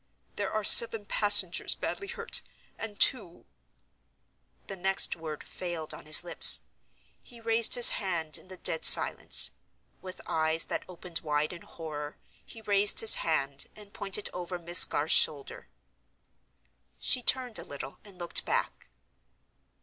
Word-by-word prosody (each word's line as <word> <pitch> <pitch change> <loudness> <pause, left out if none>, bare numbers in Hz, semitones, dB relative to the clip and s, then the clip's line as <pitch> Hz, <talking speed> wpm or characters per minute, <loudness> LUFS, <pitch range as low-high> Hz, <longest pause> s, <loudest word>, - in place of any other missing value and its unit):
There - - -5
are 215 0 -4
seven 225 0 +4
passengers 205 -4 +1
badly 395 - -7
hurt; - - 0 0.4
and 210 -2 -9
two—" 205 -10 +2 1.2
The 195 - -5
next 190 +1 0
word 155 -2 -10
failed 170 -3 -7
on - - -13
his 155 +2 +4
lips; 175 - +6 0.6
he 240 -2 -18
raised 230 0 +2
his 245 -1 +9
hand 170 -6 -4
in - - -5
the 185 0 -11
dead 160 - -5
silence. - - +3 0.5
With 185 0 -11
eyes 160 +1 -2
that - - -6
opened 175 -1 -7
wide 150 +1 -4
in 170 - -12
horror, 150 -3 -10 0.3
he 225 - -16
raised 205 -1 +2
his 225 - +5
hand 140 -4 -3
and 205 -1 -17
pointed 200 0 -3
over 180 0 -7
Miss 175 +1 +5
Garth's 150 +3 -1
shoulder. 145 -3 0 1.3
She 250 - -1
turned 250 -2 -1
a - - -8
little, 140 -1 -10
and 200 -3 -17
looked 175 -1 -2
back. - - -5
180 Hz, 140 wpm, -27 LUFS, 160-210 Hz, 1.3 s, his